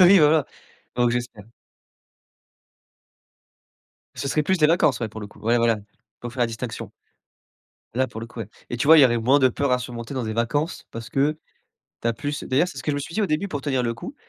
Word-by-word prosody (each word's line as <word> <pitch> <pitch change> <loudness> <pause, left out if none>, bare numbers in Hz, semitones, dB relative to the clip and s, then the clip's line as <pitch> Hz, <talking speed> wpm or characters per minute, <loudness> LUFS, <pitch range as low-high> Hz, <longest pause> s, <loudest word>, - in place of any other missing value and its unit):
Bah, 185 - +9
oui 195 +1 +8
voilà, 150 -1 +5 0.5
donc 120 -1 +3
j'espère. 120 -4 -4 2.7
Ce 140 - -3
serait 150 +2 +1
plus 190 +3 +1
des 150 - +5
vacances, 155 -6 +3
ouais, 115 - -1
pour 110 +1 -9
le 105 - -6
coup. - - -18
Ouais 115 +2 +2
voilà, 115 -1 +3
il 100 - -25 0.4
faut 120 - -5
faire 125 - -6
la 120 - +4
distinction. 115 0 -6 1.0
Là 130 +2 +2
pour 110 - -8
le 115 - -6
coup, 115 -1 -9
ouais, 105 - -6 0.2
et 120 - -2
tu 125 - -1
vois 160 0 +9
il - - +9
y - - +9
aurait 120 -2 +3
moins 130 +5 +4
de 130 -2 +5
peur 140 +2 -1
à 125 - +3
surmonter 120 +1 -6
dans 125 -3 -2
des 110 - -3
vacances, 145 - -1
parce 115 +1 -7
que 150 +3 +1 0.6
tu 115 - +1
as - - +2
plus 145 +5 -4
d'ailleurs 145 +8 +2
c'est - - -9
ce - - -6
que 150 - -1
je - - -1
me - - -2
suis 165 +4 -7
dit 220 - +1
au 200 - +2
début 170 +6 -1
pour 145 -5 -4
tenir 135 -4 0
le 115 -1 -1
coup, 255 - -8
125 Hz, 250 wpm, -24 LUFS, 115-150 Hz, 2.7 s, Bah